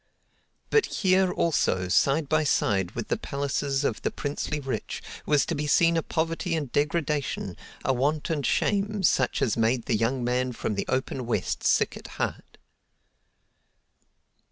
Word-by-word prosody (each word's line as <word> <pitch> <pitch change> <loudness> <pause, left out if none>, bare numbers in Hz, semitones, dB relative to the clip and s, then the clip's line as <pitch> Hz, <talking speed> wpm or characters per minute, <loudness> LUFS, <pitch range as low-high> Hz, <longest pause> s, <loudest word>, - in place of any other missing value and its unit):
But 440 - +4
here, 190 -2 +2
also, 95 - +1
side 140 - +2
by 155 +2 +2
side 95 -10 +1
with 115 - -4
the - - 0
palaces 140 0 -1
of 115 - -1
the - - 0
princely 145 +1 -3
rich, 130 -6 -4 0.2
was 150 -2 +3
to - - -2
be 150 -1 -2
seen 170 +3 +4
a 165 - +2
poverty 165 +2 -1
and 145 -6 -3
degradation, 145 - -1 0.3
a 135 - +3
want 145 +5 0
and 150 -3 -1
shame, 205 +6 +1
such 130 -6 +2
as 110 - +1
made 115 +1 +1
the 115 - +1
young 120 +4 0
man 125 +1 0
from 110 - -3
the 100 - -3
open 130 -1 -2
West 120 - -1
sick - - +2
at - - -9
heart. - - -4
140 Hz, 155 wpm, -26 LUFS, 125-160 Hz, 0.3 s, But